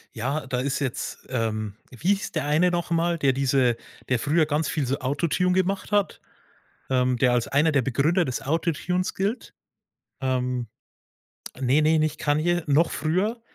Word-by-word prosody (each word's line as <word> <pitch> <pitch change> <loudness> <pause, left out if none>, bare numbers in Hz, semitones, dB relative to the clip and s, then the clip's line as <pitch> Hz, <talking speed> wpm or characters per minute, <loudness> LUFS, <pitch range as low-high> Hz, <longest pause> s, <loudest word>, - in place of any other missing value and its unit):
Ja, 135 +6 -2
da 130 -1 -2
ist 135 +2 -1
jetzt 135 -4 -4
ähm, 110 -4 -2 0.2
wie 130 +9 -3
hieß 200 - -5
der - - -1
eine 155 +5 +3
noch 175 -1 -2
mal, 170 +1 +1
der 140 -4 +2
diese 130 -3 +2 0.3
der 125 -2 +2
früher 155 +5 +2
ganz 150 +1 -1
viel 150 -4 -1
so 135 +2 -1
Autotune 170 +7 0
gemacht 190 +2 0
hat, 205 -1 +1 0.7
ähm, 125 -1 +1
der 125 0 +3
als 120 -1 +1
einer 150 +3 +3
der 140 -3 +3
Begründer 145 +9 +2
des 130 -5 -3
Autotunes 170 +5 -1
gilt? 205 +6 -2 0.7
Ähm 125 -2 -1 0.9
ne, 135 +3 +2
ne, 155 +1 +3
nicht 155 0 -1
Kanye, 160 +4 +1
noch 150 +4 +3
früher. 185 - -1
145 Hz, 165 wpm, -25 LUFS, 130-170 Hz, 0.9 s, eine